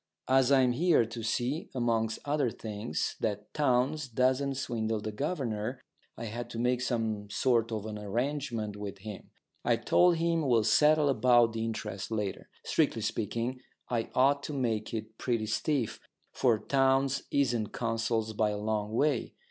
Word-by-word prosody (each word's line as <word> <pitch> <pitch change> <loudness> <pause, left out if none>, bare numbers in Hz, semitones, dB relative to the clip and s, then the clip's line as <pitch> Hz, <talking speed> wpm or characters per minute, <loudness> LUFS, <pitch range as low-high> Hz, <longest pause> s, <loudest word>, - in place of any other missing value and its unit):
As 130 0 +4
I'm 130 -2 +5
here 155 -1 +3
to 115 +1 -7
see, 120 +7 -1
amongst 115 -2 0
other 145 -3 +1
things, 110 0 -4
that 105 -1 -3
Townes 140 +1 +1
doesn't 130 +3 +1
swindle 115 -4 -2
the 110 +1 -4
governor, 125 -3 -2 0.4
I 115 - -5
had 115 +2 -5
to - - -7
make 125 +1 +1
some 110 -4 -2
sort 115 +1 +1
of 110 -2 -3
an 105 -1 -5
arrangement 115 0 -2
with 100 -1 -6
him. 105 0 -9 0.3
I've - - +1
told 175 -1 +5
him 165 0 +1
we'll 115 -4 +4
settle 150 +6 +4
about 120 -4 +4
the 115 0 -2
interest 105 -2 -4
later. 105 -3 -3 0.2
Strictly 115 - +1
speaking, 115 +3 -2 0.3
I 115 -2 -1
ought 140 +2 +4
to 150 - -5
make 115 -6 -1
it 110 0 -6
pretty 115 -3 0
stiff, 125 +2 -1 0.3
for 120 -4 +3
Townes 135 +2 +2
isn't 120 -6 +1
Consols 115 -1 -1
by 105 0 +1
a 105 - -2
long 105 0 -2
way. 150 +6 +1
115 Hz, 155 wpm, -30 LUFS, 110-135 Hz, 0.4 s, I'm